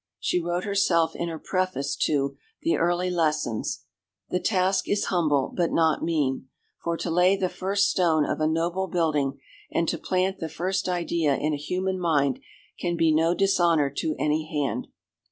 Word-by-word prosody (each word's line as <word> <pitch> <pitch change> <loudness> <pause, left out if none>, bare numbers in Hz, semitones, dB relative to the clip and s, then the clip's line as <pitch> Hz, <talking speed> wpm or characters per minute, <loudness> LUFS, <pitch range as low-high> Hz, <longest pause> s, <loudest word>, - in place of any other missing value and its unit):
She 180 - 0
wrote 175 +1 -2
herself 170 -5 +2
in 170 - -3
her 165 - -5
preface 185 -6 -1
to 140 -2 0 0.3
The 165 - +2
Early 175 +2 +1
Lessons: 155 -9 -1 0.5
"The 180 - +1
task 190 -1 +1
is 205 0 +1
humble, 150 -6 +1
but 175 -2 +1
not 160 -2 +2
mean, 145 -6 -1 0.4
for 170 0 -1
to 170 - -3
lay 180 +3 +4
the 190 -2 -1
first 195 +3 +1
stone 160 -5 +2
of - - -2
a 155 - +3
noble 170 +4 0
building 155 -6 0 0.3
and 165 - 0
to - - -2
plant 185 +1 0
the 160 - -4
first 185 +5 -2
idea 170 -4 +1
in 155 +2 -1
a - - +1
human 185 +5 -2
mind 145 -6 +1 0.4
can 175 -1 -1
be 165 -1 +3
no 165 +2 +3
dishonour 170 -7 +3
to 155 - -1
any 155 +1 0
hand." 145 -3 -1
170 Hz, 170 wpm, -26 LUFS, 155-180 Hz, 0.5 s, lay